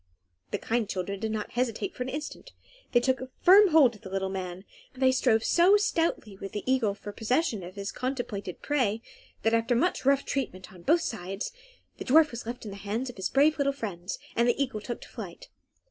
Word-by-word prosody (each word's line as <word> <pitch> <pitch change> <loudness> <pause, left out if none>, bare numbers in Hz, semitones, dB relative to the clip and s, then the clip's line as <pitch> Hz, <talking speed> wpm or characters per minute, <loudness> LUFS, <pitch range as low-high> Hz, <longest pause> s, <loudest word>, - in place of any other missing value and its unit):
The - - -1
kind 230 -2 -1
children 195 +1 -3
did 220 +1 -2
not 215 -1 -3
hesitate 250 - -1
for - - -10
an 250 - -2
instant. 300 - -6 0.4
They 240 - +5
took 260 +1 +1
a 255 - -6
firm 400 +3 +8
hold 305 -8 +6
of 215 - -15
the 190 - -9
little 190 0 -2
man, 185 0 -5 0.3
they 260 0 +4
strove 240 -4 +2
so 365 +4 +5
stoutly 330 - 0
with 195 0 -7
the 205 - -3
eagle 255 -6 +2
for 205 0 -8
possession 230 - 0
of 180 +1 -9
his 200 0 -4
contemplated 245 -8 -4
prey, 235 -7 0 0.4
that, 225 - +2
after 230 +2 +2
much 350 +10 +1
rough 275 +1 +3
treatment 190 -10 -4
on 180 - -13
both 325 - +3
sides, 195 - -4 0.5
the - - -5
dwarf 305 +3 +5
was 235 -1 -7
left 240 0 -6
in 210 - -6
the 200 - -8
hands 215 +6 -3
of - - -22
his 190 - -2
brave 295 +3 +3
little 280 0 +2
friends, 195 -8 -5 0.2
and 235 +1 +3
the 240 - +2
eagle 260 -6 -1
took 240 +3 -5
to - - -11
flight. - - -9
235 Hz, 215 wpm, -28 LUFS, 200-275 Hz, 0.5 s, firm